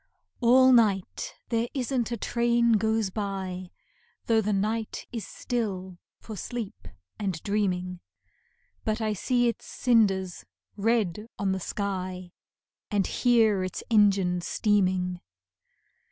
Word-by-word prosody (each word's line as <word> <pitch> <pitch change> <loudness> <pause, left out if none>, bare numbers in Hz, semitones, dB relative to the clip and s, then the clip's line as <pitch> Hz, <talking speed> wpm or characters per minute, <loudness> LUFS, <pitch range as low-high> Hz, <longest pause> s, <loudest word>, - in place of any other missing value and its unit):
All 255 +2 +6
night 205 -6 +2
there 230 0 +1
isn't 250 -3 -1
a 235 - -1
train 235 +1 +2
goes 220 -2 +2
by, 190 -3 -4 0.6
Though 225 -1 +3
the 210 0 -1
night 215 +3 -1
is 230 -5 -5
still 190 -7 -3 0.2
for 220 - -9
sleep 220 - -6 0.3
and 200 -3 -1
dreaming, 185 -3 -1 0.8
But 215 -1 -1
I 215 -1 0
see 245 +4 +1
its 235 - -3
cinders 195 -7 +2 0.3
red 210 -2 0
on 200 -3 0
the 190 - -1
sky, 185 -2 -4 0.6
And 205 -3 +1
hear 225 -6 +3
its 185 - -4
engine 195 -4 +4
steaming. 185 -3 +1
210 Hz, 115 wpm, -27 LUFS, 190-230 Hz, 0.8 s, All